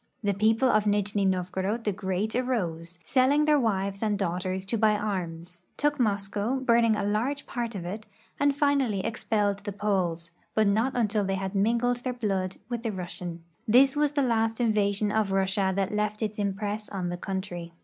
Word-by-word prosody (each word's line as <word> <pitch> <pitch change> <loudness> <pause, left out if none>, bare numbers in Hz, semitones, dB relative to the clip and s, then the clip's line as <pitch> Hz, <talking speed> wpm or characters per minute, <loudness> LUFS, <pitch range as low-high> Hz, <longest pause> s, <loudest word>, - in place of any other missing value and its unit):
The 200 -1 +2
people 220 +5 +3
of 215 -3 +3
Nijni 205 0 +1
Novgorod 190 +4 -1
the 210 - +1
Great 190 +3 -2
arose, 180 -10 -2
selling 270 - +3
their 300 -1 +4
wives 195 -4 -1
and 210 -2 +1
daughters 185 0 -2
to 225 +4 -1
buy 215 -1 +4
arms, 175 -4 -4 0.2
took 295 0 +1
Moscow, 205 +1 0
burning 235 -4 +3
a 210 - -2
large 235 +8 -1
part 235 -3 -4
of 180 -3 -5
it, 210 +5 -6 0.3
and 285 -1 +3
finally 275 -9 +1
expelled 210 -3 0
the 205 0 -5
Poles, 185 -5 -1 0.2
but 220 - +4
not 220 +6 +2
until 215 -3 +1
they 195 0 -1
had 190 0 -3
mingled 235 +4 +2
their 250 +1 -3
blood 195 -6 -2
with 240 -1 -3
the 230 -2 -2
Rus 180 -3 -5
sian. 170 -2 -6 0.2
This 265 +5 +5
was 295 0 +1
the 285 -1 +2
last 225 -2 +1
invasion 210 -2 +1
of 215 -2 +1
Russia 195 0 +1
that 195 +1 -1
left 210 +1 -1
its 215 0 -3
impress 205 +1 -2
on 185 -3 -3
the 175 - -2
country. 180 -2 -5
210 Hz, 185 wpm, -27 LUFS, 190-230 Hz, 0.3 s, This